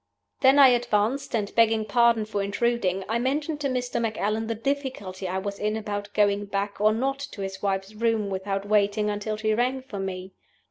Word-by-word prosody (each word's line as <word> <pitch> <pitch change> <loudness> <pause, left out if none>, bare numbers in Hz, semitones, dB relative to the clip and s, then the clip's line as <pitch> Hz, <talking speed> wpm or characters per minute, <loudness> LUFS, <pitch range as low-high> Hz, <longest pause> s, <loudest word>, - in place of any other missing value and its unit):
"Then 265 +1 +5
I 275 -2 +9
advanced, 240 +2 +1
and, 205 -3 -2
begging 225 -1 +3
pardon 230 +1 +3
for 210 -1 -2
intruding, 200 -2 0
I 230 +2 0
mentioned 290 +4 -1
to 280 - +1
Mr. 250 -2 -2
Macallan 220 0 -1
the 230 - -2
difficulty 230 -7 -3
I 185 +1 -2
was 200 +1 -4
in 215 +1 -1
about 205 -1 -4
going 205 -1 +2
back 200 0 -3
or 215 +1 +5
not 270 +5 -1
to 280 -7 -7
his 190 0 -6
wife's 195 0 -2
room 220 -2 0
without 195 +1 -3
waiting 210 0 +2
until 210 +1 -3
she 215 0 0
rang 255 +3 0
for 215 -7 -7
me. 190 0 -5
215 Hz, 190 wpm, -26 LUFS, 200-240 Hz, -, I